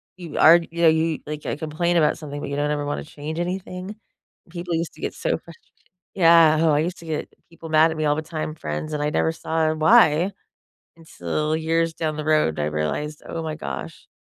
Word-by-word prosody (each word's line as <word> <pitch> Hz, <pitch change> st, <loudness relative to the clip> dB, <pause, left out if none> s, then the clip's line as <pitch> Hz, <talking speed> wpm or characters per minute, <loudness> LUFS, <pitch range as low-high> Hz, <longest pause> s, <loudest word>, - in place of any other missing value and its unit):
you 175 Hz, -5 st, -8 dB
are 165 Hz, +2 st, +8 dB
you 170 Hz, 0 st, -6 dB
know -, -, +7 dB
y -, -, +4 dB
you 160 Hz, -1 st, 0 dB
like, 150 Hz, 0 st, -6 dB
I -, -, -1 dB
complain 160 Hz, +3 st, -1 dB
about 155 Hz, -, +3 dB
something, 145 Hz, -2 st, -7 dB
but 140 Hz, -, -5 dB
you -, -, -2 dB
don't 145 Hz, +1 st, 0 dB
ever 145 Hz, -1 st, -1 dB
wanna 145 Hz, -, -3 dB
change 155 Hz, +1 st, -7 dB
anything. 180 Hz, +2 st, -4 dB, 0.5 s
People 170 Hz, 0 st, -5 dB
used 165 Hz, 0 st, -2 dB
to -, -, -16 dB
get -, -, -2 dB
so -, -, -2 dB
frust -, -, -14 dB, 0.6 s
Yeah, 165 Hz, -3 st, +6 dB
oh, 160 Hz, -2 st, +4 dB
I 145 Hz, -, +3 dB
used 175 Hz, +3 st, -3 dB
to 165 Hz, -, -12 dB
get 155 Hz, -1 st, -4 dB, 0.2 s
people 165 Hz, -1 st, -11 dB
mad 160 Hz, +1 st, +5 dB
at 160 Hz, -, -6 dB
me 155 Hz, -, -2 dB
all 145 Hz, 0 st, +2 dB
the 155 Hz, -, -2 dB
time, 155 Hz, -1 st, -5 dB
friends, 75 Hz, -, -5 dB
and 150 Hz, -1 st, -2 dB
I 150 Hz, -, 0 dB
never 160 Hz, -, +1 dB
saw 160 Hz, -1 st, -1 dB
why 160 Hz, +3 st, +4 dB, 0.6 s
until 155 Hz, -, -3 dB
years 165 Hz, 0 st, 0 dB
down 155 Hz, -2 st, -2 dB
the 155 Hz, -, -4 dB
road, 155 Hz, -, +2 dB
I 75 Hz, -, 0 dB
realized, 75 Hz, -, -3 dB
oh 165 Hz, -, -5 dB
my 160 Hz, -1 st, -4 dB
gosh, 70 Hz, -, -7 dB
155 Hz, 225 wpm, -23 LUFS, 150-165 Hz, 0.6 s, are